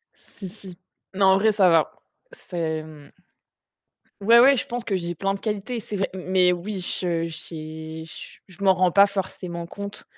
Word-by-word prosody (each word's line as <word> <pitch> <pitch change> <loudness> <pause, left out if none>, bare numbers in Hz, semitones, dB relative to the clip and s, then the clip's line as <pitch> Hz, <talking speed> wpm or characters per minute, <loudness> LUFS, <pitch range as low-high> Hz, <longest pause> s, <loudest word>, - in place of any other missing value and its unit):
Si 190 - -11
si, 190 -2 -12 0.4
non, 195 0 +3
en - - +3
vrai, 215 +3 +3
ça 200 -3 +4
va. 165 -2 +3 0.4
C'est, 165 - -4
mmh 150 -2 -13 1.1
Ouais, 230 +4 +7
ouais, 275 +2 +6
je - - -1
pense 240 0 -4
que 200 -4 -1
j'ai 175 -1 -4
plein 195 +5 -1
de 195 - -5
qualités, 220 +3 -3
c'est 215 - -6
vrai. 195 0 -1
Mais 185 -1 +2
oui, 185 +3 -4
je 175 -1 -2
j'ai 160 0 -8
j 165 - -11
je 190 +1 -16
m'en 190 -1 +6
rends 185 -1 +2
pas 200 +2 +6
forcément 185 -3 -5
compte. 200 +3 -8
185 Hz, 185 wpm, -24 LUFS, 170-200 Hz, 1.1 s, Ouais